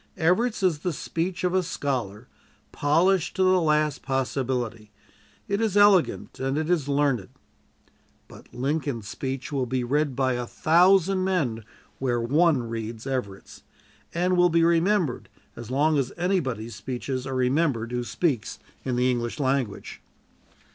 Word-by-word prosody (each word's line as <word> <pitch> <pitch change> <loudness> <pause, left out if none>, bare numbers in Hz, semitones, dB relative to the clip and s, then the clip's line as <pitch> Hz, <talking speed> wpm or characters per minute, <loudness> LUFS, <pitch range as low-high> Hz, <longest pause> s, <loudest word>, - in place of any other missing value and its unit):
Everett's 200 +7 +1
is 170 -5 +2
the 180 +1 -2
speech 175 +5 -3
of 180 0 +1
a 185 - +3
scholar, 125 - -3 0.4
polished 165 +5 +2
to 190 - +2
the 185 -1 +4
last 150 -2 +1
possibility. 125 -4 -2 0.6
It 200 +2 -1
is 215 -3 +1
elegant, 205 -4 +3
and 135 +2 -1
it 160 +2 -1
is 155 -6 +1
learned; 140 -8 +1 1.0
but - - -15
Lincoln's 135 -4 -2
speech 130 +5 -5
will 135 -3 -1
be 130 +1 -1
read 145 +2 0
by 130 -1 +1
a 120 -1 -3
thousand 185 +5 +3
men 145 - -1 0.4
where 125 -3 0
one 140 +1 +2
reads 115 0 -6
Everett's, 125 -8 -5 0.5
and 180 +2 +1
will 175 0 +5
be 165 0 +3
remembered 170 - +1 0.3
as 120 -1 -9
long 145 +3 +2
as 130 -2 -2
anybody's 135 - -1
speeches 130 +2 -4
are 135 - -3
remembered 130 -2 +1
who 125 0 -2
speaks 130 - -1 0.3
in 125 - -2
the 125 +1 +2
English 120 +3 -3
language." 130 -6 -2
140 Hz, 145 wpm, -25 LUFS, 125-170 Hz, 1.0 s, will